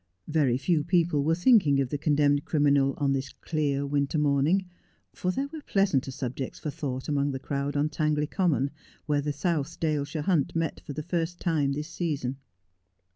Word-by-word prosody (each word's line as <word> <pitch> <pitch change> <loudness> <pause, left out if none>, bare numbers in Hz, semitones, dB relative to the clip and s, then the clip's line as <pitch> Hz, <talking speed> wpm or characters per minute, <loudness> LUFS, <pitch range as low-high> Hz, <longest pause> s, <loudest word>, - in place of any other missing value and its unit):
Very 145 -6 +2
few 150 +3 +1
people 170 -4 +2
were 160 +3 +2
thinking 175 - +4
of 135 -2 0
the 145 - -2
condemned 145 -1 +2
criminal 140 -3 +2
on 140 -2 +1
this 135 0 -3
clear 145 -3 -1
winter 140 +1 0
morning, 150 +6 +2 0.5
for 180 - -2
there 270 +9 -1
were 315 - -6
pleasanter 195 - +1
subjects 130 0 -4
for 150 - -4
thought 140 -4 -4
amongst 145 -1 0
the 135 - -3
crowd 140 +1 -2
on 145 +1 +2
Tangley 150 -1 0
Common, 150 -5 +1 0.3
where 145 -2 +1
the 150 +1 -2
South 155 +1 -2
Dale 155 -3 +1
shire 145 +1 -4
Hunt 160 -5 +1
met 165 -2 -1
for 145 - -4
the 155 - -5
first 175 0 -2
time 150 -5 +1
this 150 +2 -4
season. 145 -7 -2
145 Hz, 180 wpm, -27 LUFS, 140-165 Hz, 0.5 s, thinking